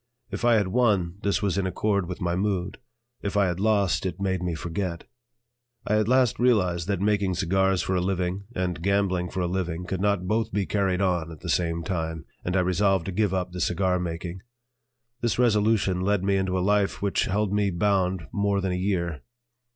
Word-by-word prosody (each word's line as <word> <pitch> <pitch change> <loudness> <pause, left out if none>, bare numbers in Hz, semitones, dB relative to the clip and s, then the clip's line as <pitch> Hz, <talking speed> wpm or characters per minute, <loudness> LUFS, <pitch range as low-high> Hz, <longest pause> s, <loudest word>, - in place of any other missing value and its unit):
If - - -5
I 120 -1 +5
had 100 -4 +2
won, 100 -6 +1
this 100 0 0
was 100 -1 +1
in 95 - 0
accord 100 0 0
with 90 - -6
my 85 -1 0
mood; 95 -1 -1 0.4
if 100 0 -2
I 100 - +4
had 90 -1 -2
lost, 100 -2 +2
it 95 -1 -3
made 95 -2 -1
me 90 -2 -2
forget. 85 +1 -4 0.8
I 105 - +2
at 110 - 0
last 125 -1 +3
realized 90 -9 +2
that 100 -3 0
making 100 -3 +1
cigars 95 +1 +1
for 95 - -1
a 90 - +1
living 95 +1 -2
and 90 -3 -2
gambling 95 -2 +1
for 95 - -3
a 90 - 0
living 90 -1 -2
could 95 0 -3
not 100 -3 +1
both 110 +2 0
be 100 0 0
carried 95 -2 0
on 85 -3 0
at 80 - -11
the - - -6
same 85 -1 0
time, 80 -3 -3 0.2
and 90 - -2
I - - +4
resolved 95 0 +2
to 95 - -3
give 100 +1 +1
up 90 -1 -2
the 90 0 -5
cigar 90 +2 +1
making. 85 +1 -5 0.8
This 120 -3 0
resolution 105 -5 +2
led 100 0 +1
me 100 0 +2
into 95 -1 0
a - - 0
life 100 -1 +1
which 100 - +1
held 100 +1 0
me 105 -1 +2
bound 95 -2 0
more 100 -1 +1
than 95 -1 -1
a - - -1
year. 90 -4 -1
95 Hz, 205 wpm, -26 LUFS, 90-100 Hz, 0.8 s, I